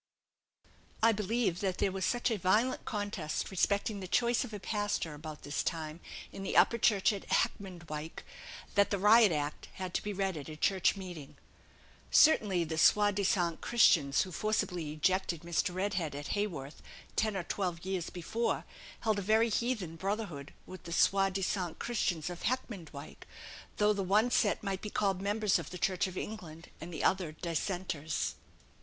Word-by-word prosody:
"I 230 - +7
believe 210 -3 0
that 190 -2 -1
there 195 - +1
was 190 0 -2
such 245 0 +1
a 220 - 0
violent 215 +8 +2
contest 205 -8 -3
respecting 200 +2 0
the 185 - -6
choice 235 +5 +2
of 250 - -8
a 210 - -6
pastor, 205 -6 -2
about 150 0 -9
this 145 - -2
time, 160 -1 -3 0.3
in - - -8
the 195 - -1
Upper 235 - +5
Chapel 205 -2 +3
at - - -13
Heckmondwike, 170 -5 -2 0.5
that 200 0 +4
the 200 - 0
Riot 210 +1 +6
Act 145 -1 -3
had 185 -2 -6
to - - 0
be 210 - -4
read 195 -3 -1
at 145 +1 -7
a 155 - -7
church 190 +5 +2
meeting." 175 -7 -9 0.7
Certainly, 205 - +5
the 160 -1 -3
soi 205 +4 +5
disant 180 -4 0
Christians 145 -12 +4
who 185 - -8
forcibly 180 -5 -1
ejected 170 +1 0
Mr. 170 +1 0
Redhead 185 -6 -1
at 145 0 -6
Haworth, 165 -9 -3 0.3
ten 215 -2 +1
or 180 - -2
twelve 175 -2 -3
years 185 -3 -2
before, 220 +7 -2 0.4
held 215 -2 +1
a - - -2
very 220 +4 +3
heathen 215 -8 -1
brotherhood 190 -7 -3
with 185 - -10
the 170 - -7
soi 195 +3 +4
disant 185 -2 -2
Christians 180 -9 -1
of 175 - -8
Heckmondwike; 185 - -5 0.5
though 210 0 +4
the 200 - -2
one 210 +6 +3
set 205 -3 +2
might 195 -2 -2
be 210 - -5
called 195 -3 0
members 205 0 +1
of - - -7
the 180 - -7
Church 185 +1 +1
of 185 0 -8
England 165 -7 -7
and 170 +2 -7
the 160 - -4
other 180 -5 +1
Dissenters. 170 -1 -2
190 Hz, 170 wpm, -32 LUFS, 165-210 Hz, 0.7 s, I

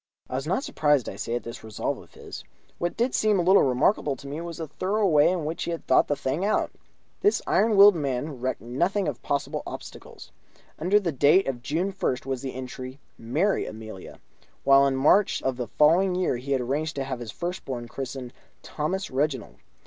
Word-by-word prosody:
I - - -9
was 135 +3 -2
not 190 - 0
surprised, 145 - +1
I - - -5
say, 115 - -3
at 120 - -3
this 115 +1 -8
resolve 110 -2 -3
of - - -17
his. - - -9 0.4
What 175 0 -2
did 245 +2 +1
seem 215 -2 +3
a 175 - +2
little 190 +3 +6
remarkable 140 +3 +2
to 140 - -11
me 145 +4 -5
was 170 -1 -6
the 165 - -4
thorough 195 +8 -1
way 150 -5 +5
in 175 -4 -1
which 160 +2 -3
he - - -4
had 170 -1 -4
thought - - +4
the 145 - +1
thing 145 +6 -2
out. 210 - +1 0.5
This 410 +1 +3
iron 220 0 +3
willed 200 +1 +9
man 140 -3 -3
recked 130 -2 -2
nothing 175 - 0
of 140 -5 -4
possible 140 -1 -2
obstacles. - - -10 0.5
Under 185 +6 +3
the 180 -5 -1
date 150 +7 +4
of 125 -3 -3
June 170 +9 -1
1st 130 -10 -2
was 135 -2 -3
the 135 -2 -5
entry: 130 +1 -7 0.2
"Marry 155 - 0
Amelia"; 110 -3 -9 0.4
while 140 0 +6
in 135 - 0
March 170 +9 +4
of 130 -1 0
the 125 -2 -3
following 180 +5 +3
year 180 -8 0
he 130 +3 -6
had 130 - +1
arranged 150 +6 -2
to 135 - -2
have 130 -2 -4
his 115 -3 -6
first 180 +2 -5
born 120 -3 -5
christened 130 -1 -6 0.3
Thomas 185 +6 -3
Reginald. 135 -1 -2
145 Hz, 210 wpm, -26 LUFS, 130-180 Hz, 0.5 s, willed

